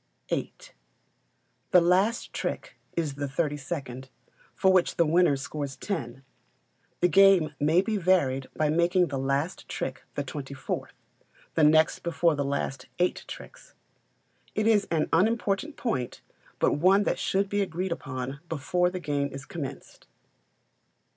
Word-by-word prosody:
viii. - - -1 1.2
The 180 - +7
last 185 +7 +2
trick - - -4 0.2
is 155 -4 0
the 145 0 -3
thirty 150 +2 -1
second, 135 -3 -6 0.5
for 190 -1 +4
which 185 -2 +3
the 170 - +3
winner 165 -1 +4
scores 140 0 -5
ten. 135 - -5 0.8
The 180 - +5
game 190 -4 +5
may 160 +5 +3
be 215 0 -1
varied 145 -8 +2
by 155 -1 +1
making 175 +2 +3
the 135 -2 -3
last 140 +6 -1
trick - - -4
the - - -1
twenty - - -7
fourth - - -4 0.6
the 160 - +2
next 155 +1 +5
before 170 -1 +1
the 145 -1 -1
last 140 -1 -3
eight 180 0 0
tricks. - - -11 0.8
It 215 - +1
is 215 -3 +3
an 160 -2 +1
unimportant 220 - +1
point, 130 - -3 0.4
but - - +2
one 190 +5 +5
that - - -1
should 195 +1 +1
be 205 +1 0
agreed 185 0 -2
upon 135 -3 -4
before 180 +4 +1
the 185 0 -5
game 145 -3 -1
is 135 0 -8
commenced. 140 -5 -8
165 Hz, 145 wpm, -27 LUFS, 140-185 Hz, 1.2 s, The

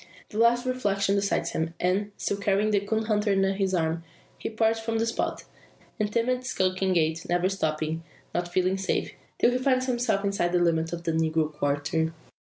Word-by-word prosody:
The 210 - -4
last 240 +2 +4
reflection 200 -6 +1
decides 200 0 0
him; 160 +1 -2
and, 195 +3 +1
still 200 - -1
carrying 200 +1 +1
the 205 - +4
coon 220 +2 -1
dog 215 -1 0
under 195 -1 +3
his 190 -1 0
arm, 165 0 0 0.4
he - - -3
parts 225 0 +1
from 225 0 -2
the 225 - +1
spot, 230 - -2 0.6
in 210 - +2
timid 245 +4 0
skulking 185 -4 0
gait, 160 -1 +1
never 175 +1 +2
stopping, 160 -3 -1 0.3
not 175 0 -1
feeling 185 +1 +1
safe, 190 - -1 0.3
till 240 - +4
he 250 - 0
finds 255 -1 +2
himself 240 -5 0
inside 190 -3 0
the 180 - +4
limits 165 -2 +1
of 170 0 -5
the 165 - 0
"negro 160 -1 +1
quarter." 145 +3 0
195 Hz, 190 wpm, -27 LUFS, 165-220 Hz, 0.6 s, last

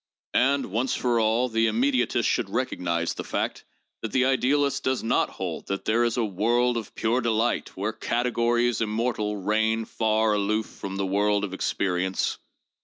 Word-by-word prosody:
And, 135 -3 +2
once 120 +6 0
for 120 -2 +1
all, 115 +3 +2
the 115 -1 +1
im 110 +1 0
mediatist 130 -1 +2
should - - 0
recognize 85 -1 -1
the - - -6
fact - - -3 0.4
that 110 - -4
the 130 0 +3
idealist 135 +2 +2
does 130 -1 0
not 115 - +2
hold - - -5
that 100 0 -3
'there 115 +2 +3
is 120 0 -1
a 120 - +2
world 120 +5 +1
of 115 -3 -5
pure 115 +3 +1
delight' 115 -2 0
where 105 +3 -2
categories 120 0 0
immortal 110 -1 -1
reign, 110 +3 +1
far 110 -1 +1
aloof 105 +1 0
from 95 0 -7
the 100 0 -1
world 100 +1 +1
of 95 -2 -3
experience. 95 -1 -1
110 Hz, 170 wpm, -26 LUFS, 105-120 Hz, 0.4 s, the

